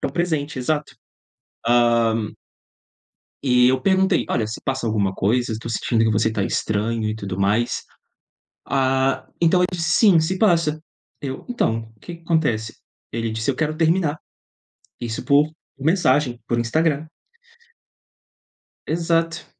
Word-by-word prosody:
Tão - - -2
presente, 155 -5 -1
exato. 150 +3 -1 0.8
Hã 115 -2 +3 1.1
E 125 -2 +4
eu 130 0 +1
perguntei: 190 0 +2
"Olha, 110 - 0
se 110 - -6
passa 135 -2 -2
alguma 100 -3 0
coisa? 120 +4 +1
Eu 110 - -5
tô 115 - -7
sentindo 115 0 +1
que 110 - +2
você 110 +1 +1
tá 105 -2 -1
estranho 110 +2 -1
e 110 - -3
tudo 100 -3 -5
mais". 105 +5 +1 0.8
Ah, 135 0 +1
então 170 +2 +4
ele 180 - +3
disse: 165 -2 -1
"Sim, 195 -6 +5
se 180 +4 -1
passa". 165 -7 +2 0.4
Eu: 135 -2 -5
"Então, 115 - 0 0.2
o - - -32
que 175 +8 -8
que 170 - -22
acontece?" 145 -11 0 0.4
Ele 115 0 -2
disse: 110 +4 -1
"Eu 130 - -4
quero 155 0 -1
terminar". 160 -1 +1 0.8
Isso 115 -2 -4
por 145 +1 +4 0.3
mensagem, 140 -5 +2
por 120 - 0
Instagram. 150 +5 0 1.8
Exato. 165 0 0
130 Hz, 140 wpm, -22 LUFS, 115-160 Hz, 1.8 s, Sim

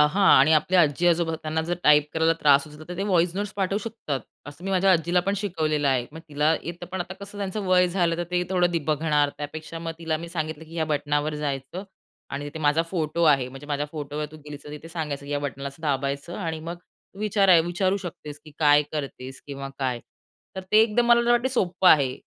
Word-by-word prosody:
आहा, 150 +7 +3 0.2
आणि 140 +4 +5
आपल्या 175 +4 +4
आजी-आजोबा 170 +1 +2
त्यांना 155 +1 -1
जर 175 - +1
टाइप 150 0 +6
करायला 160 0 +3
त्रास 140 -1 +5
होतो 150 +1 -12
तर, 180 - -6
ते - - 0
व्हॉईस 175 -3 +2
नोट्स 205 +1 -3
पाठवू 195 +1 0
शकतात. 215 - -4 0.3
असं 145 +5 -11
मी 195 - -2
माझ्या 190 0 +4
आजीलापण 175 +3 +1
शिकवलेलं 155 -7 0
आहे. 125 -3 +1
मग 160 - -9
तिला 150 +2 +2
येतं, 170 +1 -7
पण 190 - -3
आता 180 +1 -5
कसं 200 +1 -9
त्यांचं 200 0 -3
वय 180 -1 +4
झालं 175 -2 +1
तर, 175 - -2
ते 180 0 +1
थोडं 175 -4 +1
बघणार 150 -1 +2
त्यापेक्षा 155 +2 -6
मग 165 0 -4
तिला 165 -1 -1
मी 170 +2 -8
सांगितलं, 160 -2 -4
की 160 +1 -14
"या 160 - +1
बटनावर 150 0 -1
जायचं 145 +5 -4 0.5
आणि 140 +1 -4
तिथे 145 +2 -7
माझा 150 +1 +2
फोटो 165 -2 -1
आहे 135 -5 +4
म्हणजे 135 +3 -11
माझ्या 145 0 -2
फोटोवर 150 0 -4
तू - - -10
गेलीस 150 -1 -9
तर, 145 - -9
तिथे 150 +2 -9
सांगायचं, 150 -4 -4
की 145 - -5
या 145 - 0
बटनाला 140 -1 -4
असं 140 +4 -15
दाबायचं 140 +2 -2
आणि 165 -5 -3
मग 170 +2 -6
तू 185 +2 -24
विचार 200 -2 +3
विचारू 185 +3 0
शकतेस, 150 -5 -8
की 155 - -12
काय 145 -1 +5
करतेस? 135 -3 -6
किंवा 140 -1 -6
काय?" 130 -3 -1 0.6
तर - - -2
ते 215 - +7
एकदम 235 +2 +2
मला 235 0 +4
वाटत 240 +2 +3
सोप्पं 185 -6 +2
आहे. 135 -4 +3
160 Hz, 215 wpm, -25 LUFS, 145-180 Hz, 0.6 s, ते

